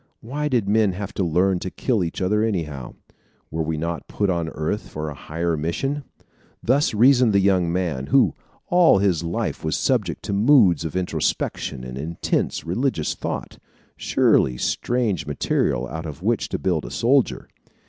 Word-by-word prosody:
Why 145 Hz, +6 st, -3 dB
did 120 Hz, -8 st, 0 dB
men 105 Hz, -2 st, +3 dB
have 100 Hz, +1 st, -6 dB
to 95 Hz, -, -1 dB
learn 90 Hz, +2 st, +2 dB
to 95 Hz, -, -4 dB
kill 110 Hz, 0 st, 0 dB
each 85 Hz, +2 st, -3 dB
other 105 Hz, +3 st, +2 dB
anyhow? 80 Hz, -, -3 dB, 0.6 s
Were 80 Hz, -, -2 dB
we 80 Hz, 0 st, -2 dB
not 85 Hz, +2 st, -4 dB
put 100 Hz, -2 st, 0 dB
on 85 Hz, -2 st, -1 dB
earth 80 Hz, +7 st, -3 dB
for 75 Hz, 0 st, -4 dB
a -, -, -6 dB
higher 85 Hz, +4 st, -2 dB
mission? 135 Hz, -, -2 dB, 0.6 s
Thus 135 Hz, -1 st, +2 dB
reasoned 125 Hz, 0 st, +5 dB
the 100 Hz, -, +5 dB
young 95 Hz, -3 st, +2 dB
man, 85 Hz, -8 st, -2 dB
who, -, -, +4 dB, 0.3 s
all 175 Hz, -, +5 dB
his 95 Hz, -4 st, +2 dB
life, 85 Hz, +1 st, -3 dB
was -, -, 0 dB
subject -, -, 0 dB
to -, -, -3 dB
moods 100 Hz, -, +4 dB
of 80 Hz, -, -5 dB
introspection 90 Hz, -7 st, -2 dB
and 65 Hz, +1 st, -7 dB
intense 80 Hz, +2 st, -2 dB
religious 95 Hz, -, -1 dB
thought -, -, -5 dB, 0.4 s
surely 60 Hz, -, +2 dB
strange 110 Hz, -, -1 dB
material 65 Hz, -3 st, 0 dB
out 80 Hz, +5 st, -6 dB
of 75 Hz, +3 st, -9 dB
which 115 Hz, +1 st, 0 dB
to -, -, -2 dB
build 90 Hz, -5 st, 0 dB
a -, -, -7 dB
soldier! 130 Hz, +2 st, +1 dB
90 Hz, 170 wpm, -23 LUFS, 80-110 Hz, 0.6 s, reasoned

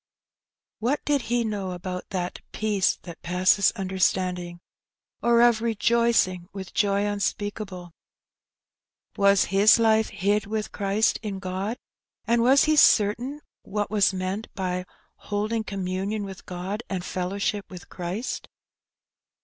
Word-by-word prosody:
What 255 Hz, +6 st, -1 dB
did 290 Hz, -2 st, +2 dB
he 240 Hz, 0 st, +2 dB
know 200 Hz, -4 st, -3 dB
about 180 Hz, +1 st, -6 dB
that 180 Hz, -2 st, -3 dB
^^ -, -, -46 dB
peace 210 Hz, -3 st, +1 dB
that 170 Hz, -2 st, -10 dB
passeth 185 Hz, +3 st, +3 dB
understanding,^' 185 Hz, -3 st, -1 dB, 0.6 s
or 235 Hz, 0 st, +4 dB
of 240 Hz, -2 st, +5 dB
'^rejoicing 230 Hz, -5 st, +2 dB
with 190 Hz, -2 st, -8 dB
joy 200 Hz, -1 st, +2 dB
unspeakable^^? 205 Hz, -3 st, -3 dB, 1.2 s
Was 200 Hz, -1 st, +4 dB
his 200 Hz, +2 st, +7 dB
life 220 Hz, -1 st, +3 dB
"hid 205 Hz, +2 st, 0 dB
with 215 Hz, 0 st, -3 dB
Christ 200 Hz, +2 st, +1 dB
in 205 Hz, -3 st, -4 dB
God,'' 190 Hz, +4 st, -3 dB, 0.5 s
and 235 Hz, 0 st, +2 dB
was 265 Hz, +4 st, +5 dB
he 310 Hz, 0 st, +3 dB
certain 245 Hz, +3 st, +3 dB, 0.2 s
what 205 Hz, 0 st, -3 dB
was 205 Hz, -2 st, +4 dB
meant 190 Hz, +3 st, -3 dB
by 180 Hz, -1 st, -2 dB, 0.2 s
" -, -, -40 dB
holding 215 Hz, +2 st, -1 dB
communion 195 Hz, +1 st, -3 dB
with 195 Hz, -2 st, -9 dB
God 185 Hz, +4 st, -4 dB
and 185 Hz, -2 st, -3 dB
fellowship 200 Hz, +3 st, -2 dB
with 180 Hz, -2 st, -10 dB
Christ 185 Hz, +7 st, -5 dB
200 Hz, 130 wpm, -25 LUFS, 185-220 Hz, 1.2 s, his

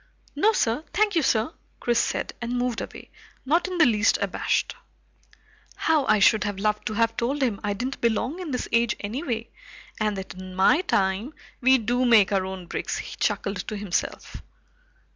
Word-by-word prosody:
"No 410 Hz, +10 st, +4 dB
sir, 245 Hz, -, 0 dB
thank 420 Hz, -2 st, +2 dB
you 330 Hz, -, +4 dB
sir," 235 Hz, +2 st, +1 dB, 0.3 s
Chris 240 Hz, -1 st, +1 dB
said, -, -, -1 dB
and 240 Hz, +1 st, -2 dB
moved 245 Hz, -2 st, -1 dB
away, -, -, -9 dB, 0.3 s
not 330 Hz, +7 st, +2 dB
in 365 Hz, -1 st, -4 dB
the 320 Hz, -, +6 dB
least 220 Hz, -3 st, +3 dB
abashed. -, -, -1 dB, 1.0 s
How 310 Hz, -4 st, +2 dB
I 215 Hz, -, +5 dB
should 210 Hz, +2 st, +4 dB
have 205 Hz, -2 st, -3 dB
loved 210 Hz, +1 st, -1 dB
to 215 Hz, -, -2 dB
have 230 Hz, +1 st, +1 dB
told 270 Hz, +5 st, -1 dB
him 225 Hz, -6 st, 0 dB
I 205 Hz, 0 st, 0 dB
didn't 255 Hz, +7 st, -4 dB
belong 235 Hz, -, 0 dB
in 360 Hz, -4 st, -5 dB
this 250 Hz, -3 st, -2 dB
age 235 Hz, -1 st, +2 dB
anyway, 230 Hz, +1 st, -4 dB, 0.5 s
and 210 Hz, -2 st, 0 dB
that 190 Hz, -, -6 dB
in 185 Hz, 0 st, -9 dB
my 195 Hz, -, +4 dB
time, 195 Hz, +9 st, 0 dB, 0.3 s
we 260 Hz, +1 st, +6 dB
do 245 Hz, +2 st, 0 dB
make 225 Hz, -6 st, +5 dB
our 190 Hz, -2 st, +1 dB
own 190 Hz, -1 st, -7 dB
bricks! -, -, -3 dB
he -, -, -7 dB
chuckled 200 Hz, -1 st, -1 dB
to 215 Hz, -, -4 dB
himself. 200 Hz, -3 st, -3 dB
230 Hz, 180 wpm, -25 LUFS, 205-265 Hz, 1.0 s, the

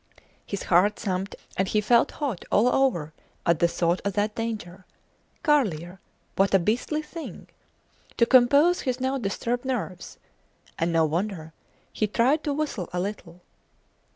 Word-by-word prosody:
His 200 Hz, -, -4 dB
heart 190 Hz, +4 st, +3 dB
thumped, 190 Hz, 0 st, -3 dB, 0.2 s
and 190 Hz, -, +1 dB
he 210 Hz, -, +1 dB
felt 235 Hz, +3 st, +3 dB
hot 270 Hz, -, -3 dB
all 220 Hz, +4 st, +4 dB
over 250 Hz, -, +1 dB, 0.3 s
at 170 Hz, -2 st, +3 dB
the 170 Hz, -, +4 dB
thought 170 Hz, +1 st, 0 dB
of 200 Hz, -, -1 dB
that 210 Hz, +1 st, 0 dB
danger. 210 Hz, -5 st, -5 dB, 0.6 s
Carlier! 190 Hz, -, +1 dB, 0.4 s
What 195 Hz, 0 st, +3 dB
a -, -, +8 dB
beastly 235 Hz, -, -1 dB
thing! 330 Hz, +1 st, -9 dB, 0.7 s
To 235 Hz, -, +5 dB
compose 280 Hz, +8 st, +5 dB
his 255 Hz, -1 st, -2 dB
now 260 Hz, +1 st, -1 dB
disturbed 235 Hz, +3 st, -2 dB
nerves 230 Hz, -9 st, -4 dB, 0.6 s
and 165 Hz, +1 st, +1 dB
no 165 Hz, -1 st, +3 dB
wonder! 165 Hz, 0 st, -3 dB, 0.4 s
he 215 Hz, -, 0 dB
tried 260 Hz, +8 st, +2 dB
to 290 Hz, -, 0 dB
whistle 285 Hz, -, -3 dB
a 180 Hz, -, -2 dB
little. 180 Hz, -3 st, -6 dB
210 Hz, 150 wpm, -25 LUFS, 180-255 Hz, 0.7 s, a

